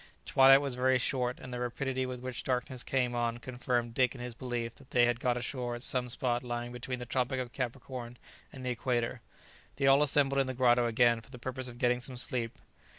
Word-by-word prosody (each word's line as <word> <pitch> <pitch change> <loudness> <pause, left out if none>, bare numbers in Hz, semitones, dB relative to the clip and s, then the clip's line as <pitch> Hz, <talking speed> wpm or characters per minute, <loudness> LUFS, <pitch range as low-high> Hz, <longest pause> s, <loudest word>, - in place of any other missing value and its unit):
Twilight 135 +1 +7
was 140 -2 -2
very 130 +1 +3
short, 125 0 -1
and 125 - -8
the 125 - -3
rapidity 130 +1 -2
with 125 -1 -6
which 130 -1 -4
darkness 125 0 -1
came 125 -2 0
on 120 -1 0
confirmed 125 -1 -2
Dick 130 +1 +2
in - - -9
his 125 -1 -5
belief 120 -1 -4
that 135 - -17
they 120 -1 +4
had 120 0 +1
got 125 -1 +1
ashore 120 0 -3
at 120 - -8
some 125 -1 +1
spot 120 0 +1
lying 120 0 -4
between 125 +1 -4
the 125 - -6
tropic 130 +1 0
of 125 -2 -5
Capricorn 125 -1 -5 0.3
and 130 -3 -9
the 125 - 0
equator. 120 0 -1 0.5
They 140 - 0
all 135 +1 +6
assembled 140 -1 +3
in 135 - -1
the 130 - -3
grotto 120 -1 +4
again 115 0 +3
for 115 - -19
the 130 - -10
purpose 130 +1 -4
of 120 -1 -9
getting 125 -1 +2
some 125 0 -7
sleep. 120 -2 -1
125 Hz, 220 wpm, -31 LUFS, 120-130 Hz, 0.5 s, Twilight